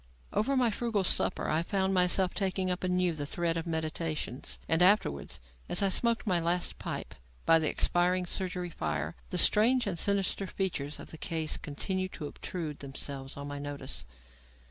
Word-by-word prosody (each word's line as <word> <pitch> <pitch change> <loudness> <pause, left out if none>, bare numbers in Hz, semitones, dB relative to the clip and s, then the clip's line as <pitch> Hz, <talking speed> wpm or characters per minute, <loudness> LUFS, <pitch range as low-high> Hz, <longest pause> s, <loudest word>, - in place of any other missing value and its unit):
Over 270 +5 +1
my 245 -3 +3
frugal 220 -2 0
supper - - +3
I 155 +1 +2
found 190 +2 0
myself 180 0 +3
taking 190 -2 0
up 180 +1 -2
anew 180 -1 +2
the 145 -2 -4
thread 170 +1 0
of 165 +1 -3
my - - -2
meditations, 155 -4 -2
and 160 +1 +2
afterwards, 180 - +3 0.3
as - - +2
I 195 - +3
smoked 235 +4 +2
my 180 -4 +2
last 175 +1 0
pipe - - -5 0.3
by 165 - +6
the 155 - +1
expiring 180 +1 +2
surgery 180 -1 -2
fire, 75 - -2 0.2
the 180 - -2
strange 235 +8 +5
and 185 -5 -2
sinister 200 0 +1
features 150 -7 -2
of - - -9
the 160 - -10
case 160 -4 -1
continued 185 +6 -2
to 150 - -6
obtrude 155 0 -5
themselves 135 0 -5
on 140 0 -6
my 145 0 -5
notice. 145 - -5
175 Hz, 175 wpm, -30 LUFS, 155-190 Hz, 0.3 s, by